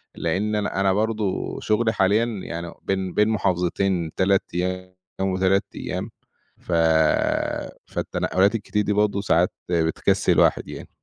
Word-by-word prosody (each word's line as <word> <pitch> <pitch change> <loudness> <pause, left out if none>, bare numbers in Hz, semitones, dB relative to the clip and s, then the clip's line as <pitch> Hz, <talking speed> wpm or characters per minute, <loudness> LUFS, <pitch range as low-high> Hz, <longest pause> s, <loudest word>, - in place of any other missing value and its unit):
لإن 105 +3 -1
أنا 100 -1 -1
أنا 95 -1 +3
برضه 110 -1 -1
شُغلي 110 +1 +1
حاليًا 105 +4 +3
يعني 85 -7 -6
بين 95 -2 -2
بين 105 +1 +3
محافظتين 90 -3 0
3 95 +1 +2
أيام 90 +1 -3 0.3
و3 95 +1 +2
أيام - - -4 0.5
ف - - -9 1.2
فالتنقلات 100 +4 +1
الكتير 105 -1 -1
دي 105 - 0
برضه 100 -1 +1
ساعات 90 -2 +2 0.2
بتكسّل 80 -2 +1
الواحد - - +3
يعني. - - -9
95 Hz, 125 wpm, -23 LUFS, 90-105 Hz, 1.2 s, أنا